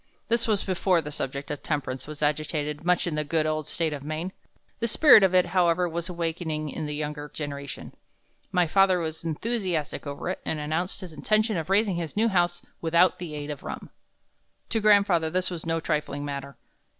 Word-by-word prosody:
"This 235 0 +2
was 210 -3 +1
before 185 -1 +2
the 150 -2 -5
subject 140 -1 -4
of 145 - -4
temperance 140 -4 -3
was 150 0 -5
agitated 150 0 -1
much 180 0 +2
in 175 - -2
the 150 0 0
good 155 +1 0
old 155 -1 -1
State 165 -2 -1
of 145 - -5
Maine. 155 +5 -3 0.5
The 230 - 0
spirit 265 0 +8
of 190 -1 +3
it, 180 - +5
however, 180 -1 +2
was 170 +1 -4
awakening 165 -3 -2
in 155 +1 -4
the 150 - -3
younger 150 0 -4
generation. 140 -1 -6 0.6
My 180 -2 +3
father 190 +2 +4
was 160 -1 -4
enthusiastic 170 - -2
over 140 +4 -4
it, 185 - -3
and 155 - -2
announced 160 +6 -2
his 180 -4 -8
intention 215 +5 +1
of 165 -1 -3
raising 195 -2 +3
his 170 +2 -5
new 225 +2 +4
house 175 -3 +1 0.2
without 170 +2 +3
the 165 -4 -6
aid 145 0 -4
of 145 - -7
rum. - - -7 0.8
To 225 - +1
grandfather 200 -6 +4
this 185 +2 -1
was 170 -2 -5
no 165 0 +1
trifling 150 -2 -2
matter. 140 -2 -6
165 Hz, 195 wpm, -26 LUFS, 150-185 Hz, 0.8 s, spirit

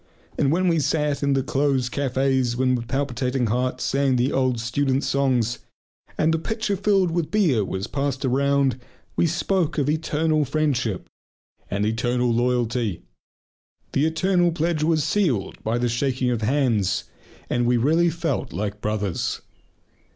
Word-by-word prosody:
And 135 - +1
when 185 +3 +2
we 165 -2 +3
sat 150 -1 0
in 140 -1 +2
the 135 -1 +1
close 135 -1 +1
cafés 130 -2 0
and 130 -1 +3
with 120 -1 -4
palpitating 130 -1 -1
hearts 125 +3 -1
sang 135 -1 +1
the 125 +3 +1
old 130 -2 +1
student 130 +3 0
songs, 125 -4 +1 0.6
and 160 +1 +2
the 165 - +1
pitcher 220 +3 -2
filled 195 -2 +2
with 165 -2 -1
beer 165 - +2
was 95 0 -3
passed 140 -1 -2
around, 140 0 +2 0.4
we 170 - +2
spoke 170 0 0
of 145 -2 +1
"eternal 155 0 +1
friendship" 135 - -1 0.6
and 100 +1 -1
"eternal 120 +2 0
loyalty." 120 -4 0 0.9
The 145 +3 +2
"eternal" 175 +2 +2
pledge 165 -1 -1
was 155 -1 +2
sealed 135 - 0
by 115 +2 0
the 120 0 0
shaking 125 +1 0
of 120 -2 -1
hands, 115 -6 +1 0.4
and 120 -1 0
we 125 0 +3
really 160 +8 +3
felt 165 -4 -2
like 105 +2 -4
brothers. 105 -4 -2
135 Hz, 150 wpm, -23 LUFS, 120-155 Hz, 0.9 s, we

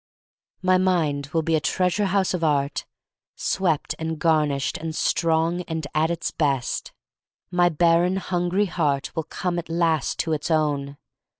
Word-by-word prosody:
My 185 0 +4
mind 160 -7 +1
will 160 +1 -1
be 165 - 0
a - - +3
treasure 185 +5 +1
house 190 0 +1
of 175 -2 -2
art, 145 -2 0 0.5
swept 170 -6 0
and 160 0 -3
garnished 150 -4 +1
and 160 -1 -5
strong 165 +2 +1
and 160 -2 -3
at 155 +1 +2
its 170 0 -2
best. 140 -5 -1 0.6
My 175 -1 +4
barren, 170 +3 +3
hungry 185 +1 0
heart 145 -6 -1
will 160 -2 -2
come 175 0 -2
at 165 - -8
last 165 -3 +1
to 160 - -1
its 155 - -2
own. 145 -3 0
165 Hz, 155 wpm, -24 LUFS, 150-175 Hz, 0.6 s, My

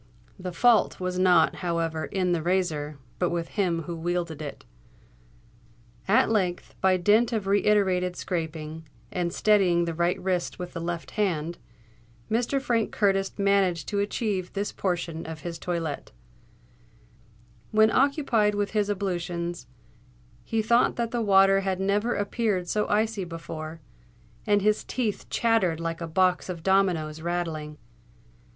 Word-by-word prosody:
The 180 0 -5
fault 230 +5 +3
was 185 0 -2
not, 180 -3 +4
however, 165 -3 -1
in 185 +1 -1
the 170 -2 +1
razor, 155 -4 -1 0.2
but 180 - +2
with 170 -1 -3
him 175 -5 0
who 170 +2 -5
wielded 170 -2 -2
it. 145 -2 -7 1.4
At 230 +7 +4
length, 185 -5 -1
by 190 -1 +4
dint 210 +7 +3
of 220 -4 -1
reiterated 195 -3 +2
scraping, 160 -3 -4 0.2
and 175 -4 -1
steadying 185 -4 +3
the 170 - -2
right 170 +2 0
wrist 180 -2 -1
with 180 0 -7
the 165 - -5
left 170 0 -4
hand, 170 -6 -1 0.7
Mr. 240 +5 +1
Frank 235 -4 0
Curtis 195 -2 +1
managed 195 -5 +2
to 205 - -1
achieve 200 -2 -2
this 200 +1 -2
portion 170 -4 -3
of 160 -1 -7
his 170 -1 -6
toilette. 165 -4 -3 1.6
When 220 0 +4
occupied 255 -7 +2
with 205 0 -1
his 210 -2 0
ablutions, 175 - -3 0.8
he 225 - -1
thought 235 +3 +3
that 235 -1 -2
the 240 - -1
water 195 -2 +5
had 190 -1 -2
never 205 +5 +1
appeared 205 -3 -1
so 210 +4 0
icy 215 0 +1
cold 180 - -6
before; 165 -1 -7 0.7
and 205 -1 +3
his 210 0 +2
teeth 225 -5 -3
chattered 210 -8 +2
like 165 0 -3
a 170 - -3
box 185 +2 +1
of 170 -3 -5
dominoes 175 -5 +1
rattling. 160 -3 -3
185 Hz, 145 wpm, -26 LUFS, 170-205 Hz, 1.6 s, water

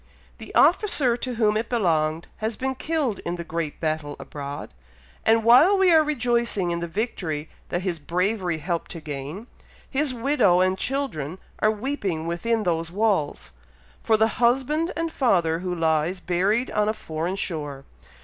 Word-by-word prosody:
The - - -10
officer 280 - +4
to 245 0 -4
whom 215 -2 +2
it 220 +2 -1
belonged, 165 -7 +1
has 220 0 -3
been 265 +1 -1
killed 290 -5 -1
in 175 - -3
the 170 - -5
great 165 -2 -4
battle 155 -2 -2
abroad; 140 - -7 0.5
and 225 0 +4
while 265 - +7
we 380 -3 +5
are 315 -1 +6
rejoicing 235 - +1
in 170 - -1
the 170 - -3
victory 165 -6 -3 0.2
that 175 +1 -2
his 175 -4 -2
bravery 180 +2 -1
helped 170 +2 -3
to 170 - -7
gain, 150 - -6 0.4
his 285 0 0
widow 235 -7 +3
and 185 0 +3
children 190 - -3 0.2
are 215 - +4
weeping 205 - -2
within 215 +7 0
those 165 -2 -1
walls, 190 - 0 0.5
for 220 - +3
the 220 +1 +4
husband 270 +8 +2
and 330 -1 -2
father 170 - +2
who 180 0 -3
lies 165 +2 +1
buried 195 +8 0
on 210 0 +1
a - - +1
foreign 165 +2 -3
shore. 145 -7 -4
190 Hz, 160 wpm, -24 LUFS, 165-240 Hz, 0.5 s, while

